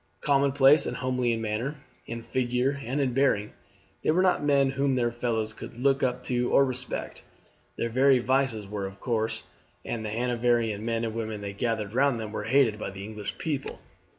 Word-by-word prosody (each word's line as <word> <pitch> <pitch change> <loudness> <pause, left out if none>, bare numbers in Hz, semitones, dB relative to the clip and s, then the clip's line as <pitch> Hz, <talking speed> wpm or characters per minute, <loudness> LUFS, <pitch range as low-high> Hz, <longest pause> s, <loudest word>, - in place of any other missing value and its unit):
Commonplace 140 +1 +4
and - - -3
homely 125 -1 0
in 115 -1 -1
manner, 115 +7 -2 0.3
in 115 0 -5
figure, 130 +3 0
and 130 +5 -2
in 130 -3 +1
bearing, 120 -6 +1 0.5
they - - -1
were 175 +4 +4
not 185 -5 +2
men 140 -2 +3
whom 135 0 +1
their 120 -2 +1
fellows 115 -2 -2
could 115 - -10
look 135 +2 +2
up 125 -1 0
to 125 -1 0
or 140 - +6
respect; 125 -1 -4 0.6
their 115 - 0
very 130 +3 +5
vices 125 -3 +1
were 100 -1 -4
coarse, 110 -1 -1 0.4
and 115 -2 -3
the 110 - -3
Hanoverian 120 -2 0
men 115 0 -1
and 110 - -3
women 110 -2 -4
they 100 -1 -5
gathered 110 -1 -2
round 135 -1 +2
them 110 -1 -5
were 105 -1 -4
hated 115 -3 +3
by - - -3
the 95 0 -8
English 105 -1 -6
people. 145 -4 -3
120 Hz, 185 wpm, -27 LUFS, 110-135 Hz, 0.6 s, or